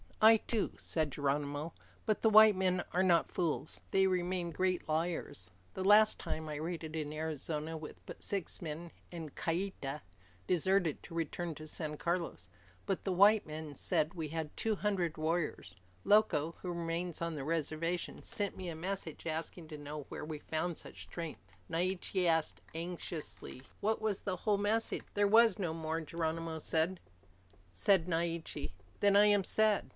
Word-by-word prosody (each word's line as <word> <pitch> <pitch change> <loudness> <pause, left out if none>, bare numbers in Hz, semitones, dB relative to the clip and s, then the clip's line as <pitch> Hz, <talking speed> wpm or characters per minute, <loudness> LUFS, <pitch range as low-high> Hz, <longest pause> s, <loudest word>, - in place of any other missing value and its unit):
"I 220 +1 +9
too," 220 0 -1
said 155 -3 -1
Geronimo, 145 +3 -1 0.3
"but 215 -2 +1
the 220 - +5
white 215 -1 +8
men 185 -1 +1
are 180 - +2
not 175 -3 +3
fools. 160 -4 -1
They 190 0 +4
remain 180 -1 0
great 185 +1 0
liars. 155 - -2 0.2
The 190 - -3
last 210 +2 +6
time, 160 0 -4
I 150 - -4
raided 160 0 -4
in 150 -2 -2
Arizona 155 0 -3
with 155 -1 -7
but - - -9
six 195 -3 -2
men, 165 +1 -5 0.2
and 160 -4 -7
Kieta 165 -5 -2 0.4
deserted 180 -2 +2
to 165 - -10
return 165 0 -2
to 155 +2 -9
San 155 -1 -2
Carlos. 170 - -2 0.4
But 195 - -1
the 195 - -1
white 200 +3 +6
men 155 -1 -6
said 155 +4 +1
we 160 -3 -3
had 160 0 -4
two 220 -1 0
hundred 185 -6 0
warriors. 155 - -1 0.3
Loco, 170 -7 +4
who 180 - -3
remains 170 0 -2
on 170 0 -2
the 145 -3 -4
reservation, 165 +2 -1
sent 205 -2 -2
me 185 -2 -4
a 165 - -5
messenger, 170 -2 -4
asking 160 +1 -4
to 155 - -6
know 145 0 -6
where - - -5
we 155 -1 -5
found 160 +2 -2
such - - -10
strength." 140 - -7 0.2
Naiche 185 +2 0
asked 160 -2 +1
anxiously, 165 -5 -6 0.2
"Was 220 -1 +1
that - - -29
the 190 -3 -1
whole 205 +3 +1
message?" 220 +3 0
"There 205 0 +4
was 225 -1 +6
no 175 -5 -1
more," 160 0 -2
Geronimo 165 0 -2
said. 165 +4 +1 0.7
Said 170 - +3
Naiche, 165 - -2 0.3
"Then 200 -1 +4
I 205 +1 +8
am 205 -1 +5
sad. 215 +2 +2
170 Hz, 165 wpm, -34 LUFS, 155-190 Hz, 0.7 s, I